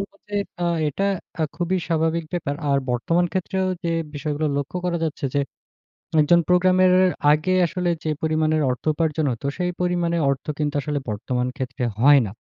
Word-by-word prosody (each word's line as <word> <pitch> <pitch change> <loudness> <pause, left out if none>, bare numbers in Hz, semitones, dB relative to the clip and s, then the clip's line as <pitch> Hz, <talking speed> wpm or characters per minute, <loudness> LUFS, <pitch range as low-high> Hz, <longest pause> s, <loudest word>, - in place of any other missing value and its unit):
বলবো 200 0 -7
যে, 205 - -7 0.3
এ্যাঁ 170 -1 +1
এটা 195 +7 -2 0.5
খুবই 180 +2 0
স্বাভাবিক 165 0 +1
ব্যাপার। 155 -5 -2 0.2
আর 140 - +3
বর্তমান 165 +9 +1
ক্ষেত্রেও 190 +1 -1 0.2
যে, 170 - 0 0.3
বিষয়গুলো 150 +1 -2
লক্ষ্য 145 +5 -3
করা 175 -1 0
যাচ্ছে 155 -2 -4
যে, 145 - +3 0.8
একজন 170 +3 +5
প্রোগ্রামের 185 +1 +4 0.4
আগে 155 +5 +2
আসলে 180 +1 -1
যে, 155 - -2
পরিমাণের 155 0 +1
অর্থ 125 - -5
উপার্জন 155 -1 0
হতো 120 +3 -6
সেই 180 0 0
পরিমাণে 175 -1 0
অর্থ 135 -1 -2
কিন্তু 145 -1 -1
আসলে 145 0 -2
বর্তমান 125 +4 -2
ক্ষেত্রে 130 -1 -4 0.2
হয় 140 +3 +7
না। - - -7
160 Hz, 165 wpm, -23 LUFS, 145-175 Hz, 0.8 s, হয়